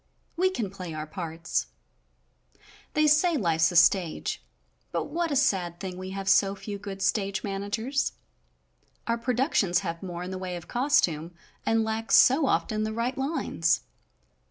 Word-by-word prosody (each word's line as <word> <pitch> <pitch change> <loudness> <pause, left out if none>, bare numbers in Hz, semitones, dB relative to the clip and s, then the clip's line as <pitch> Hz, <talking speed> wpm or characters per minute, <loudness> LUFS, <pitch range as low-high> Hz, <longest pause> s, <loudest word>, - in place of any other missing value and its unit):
We 370 +2 +3
can 230 - -3
play 185 -5 -7
our 155 0 -4
parts. 165 -1 -3 1.3
They 305 0 +4
say 305 +2 +4
life's 165 - +2
a - - -6
stage, 175 -1 +3 0.5
but - - -1
what 340 0 0
a 285 - -1
sad 180 -10 +1
thing 185 -1 -5
we 185 0 -6
have 195 0 -5
so 195 0 +4
few 200 0 -6
good 195 -1 -6
stage 195 -1 0
managers. 220 +8 -2 0.9
Our 230 0 0
productions 230 - +1
have 165 -3 -4
more 175 -2 -5
in 180 - -6
the 185 - -4
way 185 -1 -4
of 175 -1 -8
Costume 175 - +1 0.3
and 225 0 +3
lack, 220 +1 -3
so 270 +2 +6
often, 215 -4 0
the 215 0 -2
right 235 +3 -1
lines. 270 - 0
195 Hz, 155 wpm, -27 LUFS, 180-245 Hz, 1.3 s, so